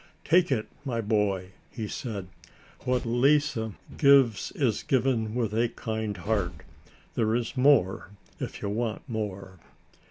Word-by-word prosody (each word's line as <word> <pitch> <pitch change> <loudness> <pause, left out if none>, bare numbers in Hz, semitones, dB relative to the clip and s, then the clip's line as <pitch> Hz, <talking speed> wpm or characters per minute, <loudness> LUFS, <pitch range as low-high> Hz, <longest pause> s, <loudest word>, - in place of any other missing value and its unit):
"Take 175 0 +4
it, 110 -5 0 0.2
my 125 -4 -2
boy," 100 -4 0 0.2
he 110 -3 -5
said. 105 -5 -5 0.6
"What 125 -1 +1
Lise 140 +6 +3 0.4
gives 135 -7 +5
is 125 -8 0
given 120 -4 +1
with 115 -4 0
a 115 +2 +2
kind 110 -3 -4
heart. 95 -1 -1 0.6
There 110 -1 +1
is 120 -1 -2
more 125 -10 +3 0.3
if - - -6
you 100 - -1
want 110 +1 -2
more." 100 -5 -5
115 Hz, 130 wpm, -27 LUFS, 105-125 Hz, 0.6 s, gives